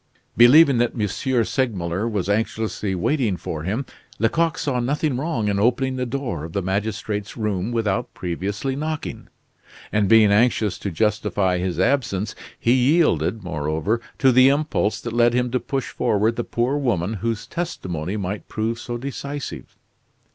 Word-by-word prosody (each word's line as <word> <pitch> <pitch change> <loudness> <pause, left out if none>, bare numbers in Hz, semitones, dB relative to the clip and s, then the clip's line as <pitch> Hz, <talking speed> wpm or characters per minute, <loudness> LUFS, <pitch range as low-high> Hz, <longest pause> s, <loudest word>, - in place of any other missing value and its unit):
Believing 130 - +7
that 120 -1 0
M. 105 - +1 0.4
Segmuller 105 -5 -1
was 100 -5 -2
anxiously 105 -1 -1
waiting 110 - 0
for 80 -2 -5
him, 105 - -2 0.3
Lecoq 165 +9 +1
saw 130 -4 -1
nothing 145 +3 0
wrong 130 -5 -1
in 100 -1 +1
opening 130 +4 +1
the 125 -1 -2
door 120 - -3
of 80 0 -7
the 100 - -1
magistrate's 105 +2 -3
room 105 -1 -1
without 110 -5 -1
previously 100 +9 -3
knocking; 155 +2 -4 0.6
and 105 -2 +1
being 110 -2 +6
anxious 110 -1 +2
to 100 - -3
justify 100 -1 0
his 90 -1 -2
absence, 110 -6 +1 0.3
he 120 - +3
yielded, 125 - +2
moreover, 80 +6 -1 0.2
to 135 -2 +4
the 130 +2 +6
impulse 140 -7 0
that 120 0 -6
led 120 0 +3
him 125 -1 +1
to 125 - +1
push 135 -1 -3
forward 110 +3 +1
the 120 - -2
poor 120 +6 0
woman 110 -7 0
whose 115 -1 -2
testimony 90 - -4
might 100 +1 -4
prove 115 +1 -2
so 120 0 -4
decisive. 140 +2 -6
110 Hz, 155 wpm, -22 LUFS, 100-130 Hz, 0.6 s, Believing